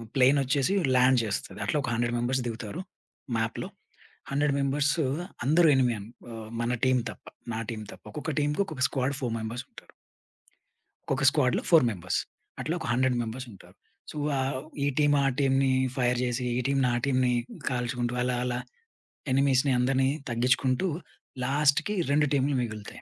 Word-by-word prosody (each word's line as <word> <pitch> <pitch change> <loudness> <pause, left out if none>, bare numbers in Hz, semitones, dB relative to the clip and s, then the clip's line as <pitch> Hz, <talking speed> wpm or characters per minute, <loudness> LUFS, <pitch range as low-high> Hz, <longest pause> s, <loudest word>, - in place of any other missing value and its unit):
Plane 135 +2 +5
ఒచ్చేసి 135 +7 +1 0.2
land 125 0 +5
చేస్తది. 105 +1 -4
అట్లా 150 - 0
ఒక 125 - -2
100 120 +1 0
మెంబర్స్ 125 +2 0
దిగుతారు. 115 - -5 0.6
మాప్‌లో 115 0 -2 0.6
100 145 0 +2
మెంబర్స్ 140 +1 +1 0.5
అందరూ 160 +4 +5
ఎనిమీ 125 -3 +3 0.4
ఆహ్, 110 -1 -8
మన 120 +1 0
టీమ్ 130 -1 +4
తప్ప - - -16 0.3
నా 110 - -2
టీమ్ 110 -1 -6
తప్ప. - - -16
ఒక్కొక్క 150 +4 -4
టీమ్‌కి 150 +7 +1
ఒక్కొక్క 140 -7 -1
స్క్వాడ్ 135 +1 -1
ఫోర్ 120 -4 -2
మెంబర్స్ 115 +4 -5
ఉంటారు. - - -15 1.2
ఒక్కొక్క 135 0 +1
స్క్వాడ్‌లో 135 -4 +1
ఫోర్ 165 -5 +7
మెంబర్స్. 90 -4 -2 0.4
అట్లా 160 - -2
ఒక - - -5
100 130 0 +2
మెంబర్స్ 120 +3 -4
ఉంటారు. 95 - -16 0.4
సో, - - -12 0.2
ఆహ్, 130 0 -1 0.3
ఈ 140 - +2
టీమ్ 145 -1 +4
ఆ - - +2
టీమ్‌ని 135 -1 +3 0.3
ఫైర్ 125 -1 +2
చేసి 125 0 -1
ఈ - - +1
టీమ్ 140 0 +1
నా - - +2
టీమ్‌ని 130 -2 +2 0.4
గాల్చుకుంటూ 120 -1 -2
అలా 125 0 0
అలా 125 0 -1 0.7
ఎనిమీస్‌ని 135 0 +3
అందరిని 130 +1 +2 0.2
తగ్గించుకుంటూ 130 +7 +2 0.6
లాస్ట్‌కి 150 +8 +2
2 150 +1 +3
టీమ్‌లు 140 0 +2
మిగులుతాయి. 110 -3 -6
130 Hz, 155 wpm, -28 LUFS, 120-140 Hz, 1.2 s, ఫోర్